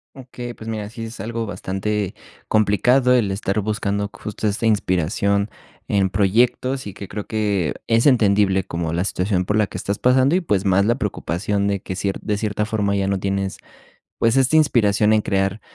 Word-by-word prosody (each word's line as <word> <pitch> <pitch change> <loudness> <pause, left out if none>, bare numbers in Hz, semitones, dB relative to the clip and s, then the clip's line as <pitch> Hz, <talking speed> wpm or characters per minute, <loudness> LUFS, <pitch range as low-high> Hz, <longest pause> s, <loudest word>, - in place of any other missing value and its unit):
Okey, 125 -2 -8
pues, 110 - -10
mira, 105 -2 -4
sí 115 0 -7
es 115 +1 -9
algo 115 +3 -3
bastante 100 0 -3 0.3
complicado 120 +5 +3
el 115 -6 +2
estar 100 +1 -1
buscando 100 -1 -1
justo 105 +1 -4
esta 105 +3 -1
inspiración 100 0 +1 0.4
en 100 -2 +2
proyectos, 120 +6 +1
y 100 - -7
que 100 - -8
creo 105 +2 -6
que 105 -7 -1
es 115 +4 +3
entendible, 100 -6 +3
como 85 -1 -3
la 85 +2 0
situación 95 -1 -1
por 105 +3 0
la 105 -2 +2
que - - -7
estás 100 +2 -3
pasando 130 +5 +4
y, 185 - +2
pues, 105 - 0
más 100 +1 +3
la 120 - +2
preocupación 100 - -2
de 100 -2 -1
que 95 - -5
ciert 95 +1 -2
de 105 -2 -1
cierta 105 0 -1
forma 105 -2 0
ya 100 -1 0
no 100 -1 0
tienes, 95 0 -2 0.6
pues, 115 +3 +2
esta 135 +4 +3
inspiración 110 -8 +3
en 110 - +4
crear 95 +1 0
105 Hz, 185 wpm, -21 LUFS, 100-115 Hz, 0.6 s, pasando